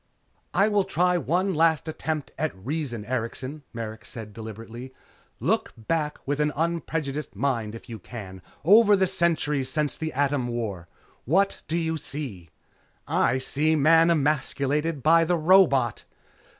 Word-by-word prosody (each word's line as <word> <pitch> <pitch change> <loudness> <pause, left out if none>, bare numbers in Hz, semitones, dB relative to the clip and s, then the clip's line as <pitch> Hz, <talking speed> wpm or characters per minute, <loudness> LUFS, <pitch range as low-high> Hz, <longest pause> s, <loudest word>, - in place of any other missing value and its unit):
"I 200 - +5
will 205 -2 +2
try 180 0 +1
one 185 +4 0
last 160 -2 +2
attempt 155 -1 -3
at 155 -9 -2
reason, 120 0 -4
Erikson," 130 +4 -4
Merrick 110 -1 -6
said 110 -3 -9
deliberately. 115 +4 -9 0.4
"Look - - 0
back 150 +6 -2
with 145 +1 -1
an 150 0 +2
unprejudiced 155 - -2
mind, 115 -2 -1
if 115 - -11
you 115 -3 -7
can, 95 -3 -9 0.2
over 210 +3 +7
the 190 -1 +3
centuries 160 -7 0
since 150 +2 0
the 160 -1 -3
Atom 140 -1 0
War. 110 -8 -4 0.4
What 195 +9 +2
do 165 - -1
you 160 -1 -1
see?" 125 - -7 0.6
"I 120 - +2
see 150 +4 +1
Man 165 +3 +5
emasculated 150 -1 0
by 165 +1 +6
the 175 +1 +1
robot!" 155 - +4
145 Hz, 140 wpm, -25 LUFS, 120-165 Hz, 0.6 s, over